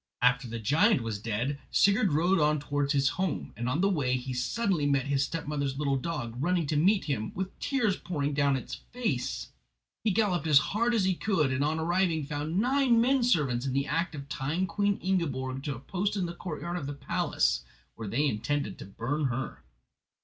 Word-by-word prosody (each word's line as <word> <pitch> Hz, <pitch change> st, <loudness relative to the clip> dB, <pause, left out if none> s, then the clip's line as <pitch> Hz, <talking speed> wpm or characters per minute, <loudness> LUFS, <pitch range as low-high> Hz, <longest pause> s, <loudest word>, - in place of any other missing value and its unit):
After 125 Hz, +1 st, +3 dB
the 115 Hz, 0 st, -5 dB
giant 155 Hz, -, +3 dB
was 110 Hz, -3 st, -3 dB
dead 120 Hz, +6 st, -2 dB
Sigurd 200 Hz, -2 st, +3 dB
rode 175 Hz, +5 st, +3 dB
on 150 Hz, 0 st, +3 dB
towards 145 Hz, 0 st, -1 dB
his 135 Hz, -1 st, +3 dB
own -, -, -8 dB
home, 185 Hz, -3 st, -2 dB
and 120 Hz, +3 st, -2 dB
on 140 Hz, +7 st, 0 dB
the 195 Hz, -, +4 dB
way 135 Hz, -10 st, +1 dB
he 130 Hz, +1 st, -5 dB
suddenly 150 Hz, -, 0 dB
met 140 Hz, -2 st, +2 dB
his 140 Hz, -1 st, +1 dB
stepmother's 145 Hz, -3 st, -3 dB
little 140 Hz, -2 st, +1 dB
dog, 135 Hz, -4 st, -3 dB
running 175 Hz, +3 st, +1 dB
to 150 Hz, -, -1 dB
meet 190 Hz, +4 st, +3 dB
him, 120 Hz, -8 st, -2 dB
with 190 Hz, +1 st, -4 dB
tears 240 Hz, -9 st, +1 dB
pouring 150 Hz, -4 st, -2 dB
down 140 Hz, -1 st, +2 dB
its 130 Hz, -, -5 dB, 0.2 s
face. 140 Hz, -, -2 dB, 0.5 s
He 220 Hz, -, +2 dB
galloped 190 Hz, -5 st, +1 dB
on -, -, -1 dB
as 145 Hz, -, +7 dB
hard 235 Hz, +10 st, +2 dB
as 215 Hz, -, +2 dB
he 190 Hz, -, +3 dB
could, 170 Hz, -7 st, +1 dB
and 135 Hz, +2 st, 0 dB
on 155 Hz, +2 st, 0 dB
arriving 170 Hz, -2 st, +1 dB
found 150 Hz, +3 st, -3 dB
nine 255 Hz, 0 st, +3 dB
men 260 Hz, +3 st, +3 dB
servants 140 Hz, -, +2 dB
in 130 Hz, -, -1 dB
the 140 Hz, +1 st, +1 dB
act 165 Hz, +3 st, -1 dB
of 140 Hz, -1 st, -7 dB
tying 150 Hz, +5 st, -1 dB
Queen 205 Hz, +1 st, 0 dB
Ingiborg 135 Hz, -8 st, -1 dB
to 145 Hz, -3 st, -2 dB
a -, -, -9 dB
post 190 Hz, -, -2 dB
in 190 Hz, -3 st, 0 dB
the 170 Hz, -, -4 dB
courtyard 175 Hz, 0 st, -5 dB
of 140 Hz, -6 st, -4 dB
the 145 Hz, -, -3 dB
palace, -, -, 0 dB, 0.3 s
where 110 Hz, -2 st, -7 dB
they 125 Hz, +9 st, +1 dB
intended 140 Hz, -1 st, -1 dB
to -, -, -7 dB
burn 120 Hz, +10 st, -2 dB
her. 130 Hz, 0 st, -3 dB
150 Hz, 210 wpm, -29 LUFS, 135-185 Hz, 0.5 s, as